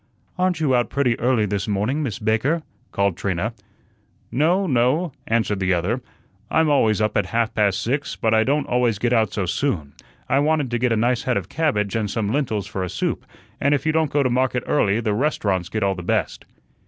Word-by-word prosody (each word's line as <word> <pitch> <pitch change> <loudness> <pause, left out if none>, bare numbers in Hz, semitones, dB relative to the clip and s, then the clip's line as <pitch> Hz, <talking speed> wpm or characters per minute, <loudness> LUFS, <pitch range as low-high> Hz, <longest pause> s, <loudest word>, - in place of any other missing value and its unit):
"Aren't 180 -2 0
you 150 -5 +2
out 120 -1 +2
pretty 125 -4 0
early 120 -3 +2
this 100 0 -2
morning, 105 +9 0
Miss 120 -10 -3
Baker?" 115 +10 0 0.3
called 100 -2 +1
Trina. 100 +4 -2 0.8
"No, 170 +9 +2
no," 140 +4 +1 0.2
answered 110 -3 0
the 95 -1 +2
other. 100 +9 -1 0.5
"I'm 160 -1 +3
always 110 -7 +3
up 110 -1 0
at - - +1
half 115 -1 0
past 100 -3 +1
six, 140 +4 -2
but 110 0 0
I 110 0 +4
don't 145 +4 +1
always 120 -3 +1
get 120 +4 0
out 110 -2 +2
so 100 - -2
soon. 85 - -2 0.3
I 135 - +2
wanted 150 -3 +1
to 120 - 0
get 125 0 +1
a 115 - +2
nice 120 +2 +1
head 125 -4 0
of 95 -2 -4
cabbage 120 -11 0
and 110 -2 -1
some 105 -1 -1
lentils 115 -9 -1
for 100 -2 -5
a 90 - -3
soup, - - -3 0.3
and 140 +1 +3
if 140 - -4
you 155 - +3
don't 160 -1 +1
go 145 0 +1
to 130 - +1
market 125 0 +1
early, 110 -6 +2
the 110 -2 0
restaurants 100 - 0
get 110 +2 -2
all 100 0 +2
the 90 - -7
best." 100 -1 -1
115 Hz, 215 wpm, -22 LUFS, 105-140 Hz, 0.8 s, I